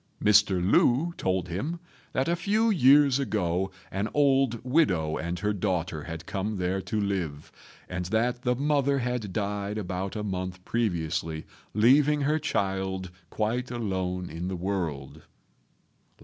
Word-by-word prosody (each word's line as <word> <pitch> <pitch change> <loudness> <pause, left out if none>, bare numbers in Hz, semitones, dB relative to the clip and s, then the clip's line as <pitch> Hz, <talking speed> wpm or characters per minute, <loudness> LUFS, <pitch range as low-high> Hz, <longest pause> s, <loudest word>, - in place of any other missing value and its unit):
Mr. 105 -3 +4
Lu 135 - +3
told 95 -1 -1
him 135 - -3 0.3
that 130 - 0
a 170 - +2
few 215 +6 +2
years 140 -5 +5
ago 95 -7 0 0.2
an 100 +3 -2
old 135 -4 +3
widow 95 - +2
and 85 +2 -3
her 105 +3 0
daughter 90 -6 -2
had 80 0 -7
come 100 +3 -3
there 95 +1 -1
to 110 +2 -2
live, 90 -8 -3 0.4
and 90 0 -4
that 115 +5 0
the 125 0 +1
mother 140 0 +1
had 125 -5 -2
died 100 0 -2
about 95 0 -3
a 105 - -3
month 90 -2 -4
previously, 80 -7 -1 0.3
leaving 140 +7 +5
her 150 +3 +2
child 95 - -2 0.2
quite 120 +6 -1
alone 95 -6 -2
in 85 +3 -5
the 95 - -2
world. 85 -7 -3
100 Hz, 140 wpm, -27 LUFS, 90-125 Hz, 0.4 s, years